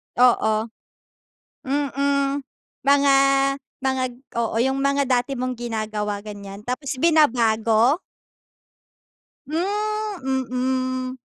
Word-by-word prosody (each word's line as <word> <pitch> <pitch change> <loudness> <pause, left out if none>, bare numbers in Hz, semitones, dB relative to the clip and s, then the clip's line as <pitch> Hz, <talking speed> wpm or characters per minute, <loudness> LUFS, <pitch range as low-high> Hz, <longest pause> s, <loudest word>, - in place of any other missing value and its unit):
Oo. 240 -3 +4 1.1
Mm, 280 0 0 0.4
mga, 280 0 +5 0.7
mga 265 -1 0 0.4
oo 225 -1 -1
yung 265 +3 +1
mga 280 0 +2
dati 250 +2 +1
mong 255 0 -2
ginagawa 215 -3 -3
ganyan 200 -1 -8
tapos 260 +2 -3
binabago? 240 - +3 1.5
Hmm, 400 -6 -1 0.7
mm. - - -21
265 Hz, 80 wpm, -23 LUFS, 230-280 Hz, 1.5 s, mga